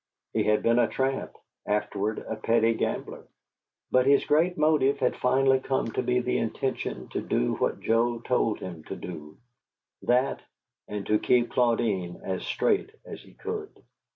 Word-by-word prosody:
He -, -, +2 dB
had 105 Hz, 0 st, +2 dB
been 115 Hz, +1 st, +4 dB
a 120 Hz, -, +4 dB
tramp, 135 Hz, 0 st, -2 dB, 0.3 s
afterward 105 Hz, 0 st, -1 dB
a 110 Hz, -, -3 dB
petty 115 Hz, +1 st, +2 dB
gambler; -, -, -3 dB, 0.6 s
but 130 Hz, +1 st, +4 dB
his 140 Hz, 0 st, +5 dB
great 165 Hz, +4 st, +2 dB
motive 150 Hz, -3 st, +3 dB
had 130 Hz, -3 st, +1 dB
finally 135 Hz, +1 st, +3 dB
come 130 Hz, -3 st, -1 dB
to -, -, -1 dB
be 125 Hz, 0 st, +1 dB
the 125 Hz, -, 0 dB
intention 115 Hz, -, -3 dB
to -, -, -3 dB
do -, -, 0 dB
what -, -, -1 dB
Joe 120 Hz, +1 st, +2 dB
told 115 Hz, -2 st, 0 dB
him 85 Hz, -4 st, -7 dB
to -, -, -6 dB
do: 75 Hz, -4 st, -9 dB, 0.6 s
that, 125 Hz, +2 st, +1 dB, 0.5 s
and 105 Hz, -1 st, -5 dB
to 105 Hz, 0 st, +2 dB
keep 120 Hz, -1 st, +2 dB
Claudine 115 Hz, -7 st, +1 dB
as 95 Hz, -1 st, -3 dB
straight 405 Hz, -2 st, +1 dB, 0.2 s
as -, -, -8 dB
he -, -, -18 dB
could. 430 Hz, -1 st, -6 dB
120 Hz, 160 wpm, -27 LUFS, 105-135 Hz, 0.6 s, his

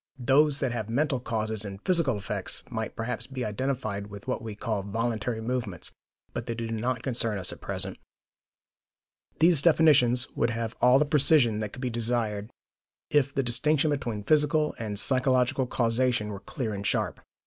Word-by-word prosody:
Those 135 Hz, +3 st, +3 dB
that 130 Hz, -3 st, 0 dB
have 115 Hz, -3 st, -4 dB
mental 135 Hz, +2 st, +1 dB
causes 110 Hz, -3 st, -2 dB
and 100 Hz, -2 st, -7 dB
physical 165 Hz, -, +2 dB
effects 100 Hz, -1 st, -4 dB
might 110 Hz, -2 st, -4 dB
perhaps 115 Hz, +2 st, -4 dB
be 130 Hz, -2 st, -4 dB
identified 110 Hz, -2 st, -3 dB
with 100 Hz, -1 st, -11 dB
what -, -, -2 dB
we 110 Hz, -2 st, -6 dB
call 105 Hz, -1 st, -2 dB
voluntary 110 Hz, +2 st, -2 dB
movements; 115 Hz, -7 st, -3 dB, 0.4 s
but -, -, -5 dB
they 115 Hz, -, -2 dB
do 115 Hz, 0 st, -4 dB
not 120 Hz, +2 st, -2 dB
concern 115 Hz, -5 st, +1 dB
us 95 Hz, -, -1 dB
at -, -, -13 dB
present. -, -, -3 dB, 1.4 s
These 165 Hz, -3 st, +5 dB
definitions 145 Hz, -7 st, +5 dB
would 115 Hz, -, 0 dB
have 115 Hz, 0 st, -3 dB
all 125 Hz, +1 st, +6 dB
the 150 Hz, -, +3 dB
precision 140 Hz, -6 st, +4 dB
that 105 Hz, -1 st, -3 dB
could 130 Hz, -, -9 dB
be 125 Hz, -, -1 dB
desired 115 Hz, -3 st, -1 dB, 0.6 s
if 140 Hz, -2 st, +3 dB
the 135 Hz, -, 0 dB
distinction 150 Hz, +5 st, +2 dB
between 120 Hz, -7 st, -3 dB
physical 150 Hz, +3 st, +2 dB
and 105 Hz, -3 st, -4 dB
psychological 130 Hz, +1 st, +2 dB
causation 115 Hz, -2 st, +1 dB
were 100 Hz, -2 st, -6 dB
clear 110 Hz, +2 st, -4 dB
and 100 Hz, -1 st, -5 dB
sharp. -, -, -1 dB
120 Hz, 170 wpm, -27 LUFS, 110-135 Hz, 1.4 s, all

